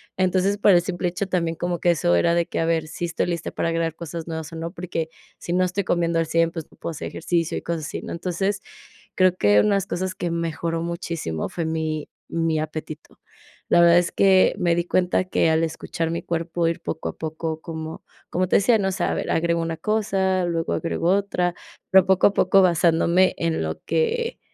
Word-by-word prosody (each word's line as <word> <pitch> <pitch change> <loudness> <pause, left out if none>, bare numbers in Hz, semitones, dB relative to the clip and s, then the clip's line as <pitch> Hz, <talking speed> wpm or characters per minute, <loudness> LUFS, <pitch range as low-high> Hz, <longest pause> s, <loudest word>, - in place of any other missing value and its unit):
entonces, 185 +2 +1
por 205 - +4
el 175 - +5
simple 180 -1 -2
hecho, 180 +3 -2
también 170 -3 -1
como 175 0 -2
que 175 - +2
eso 145 - +3
era 170 - +3
de 170 -1 +2
que, - - -4
a 165 - +1
ver, 165 -1 0
si 170 +2 -4
estoy 165 - -1
lista 170 -2 -3
para 165 - -2
crear 165 -1 -1
cosas 170 0 -7
nuevas 160 -1 -5
o - - -6
no, 165 +1 -4
porque, 170 -3 -4 0.3
si 175 - -4
no 185 - +3
estoy 185 +2 -2
comiendo 170 -1 +1
al 165 - 0
100, 165 +1 +2
pues, 165 -2 -6
no - - -20
puedo - - -5
hacer 155 - -6
ejercicio 170 -2 -1
y - - -4
cosas 165 -2 -3
así, - - -5
¿no?, - - -7
entonces, 190 +3 -2 0.5
creo 185 -1 +4
que 105 - +4
unas 200 -2 +2
cosas 185 +1 -2
que 175 - -3
mejoró 165 0 -2
muchísimo 170 - -3
fue 170 - -3
mi 160 -1 -2 0.2
mi 165 -1 0
apetito, 155 0 -7 0.5
la 170 - +5
verdad 170 0 +7
es 175 - -1
que 190 -1 +4
me 175 -3 +2
di 170 0 0
cuenta, 180 +1 +1
que 180 -3 +2
al 160 +1 +2
escuchar 165 0 -3
mi 170 - -2
cuerpo 170 0 -1
ir 165 0 -1
poco 160 - -4
a - - -9
poco 160 0 -4
como 160 -1 -7 0.3
como 185 +1 0
te - - +4
decía, 225 +3 +4
¿no?, 195 -2 0
s 185 - -2
a - - +1
ver, - - -2
agrego 170 0 +1
una 165 0 -3
cosa, 190 -3 0
luego 165 -1 -1
agrego 165 +1 -1
otra, 185 -3 +1 0.3
pero 190 -1 +6
poco 190 -1 +5
a 205 - 0
poco 195 0 +4
basándome, 175 +1 +3
en 165 - -1
lo 80 0 -4
que 460 - 0
170 Hz, 220 wpm, -23 LUFS, 165-185 Hz, 0.5 s, verdad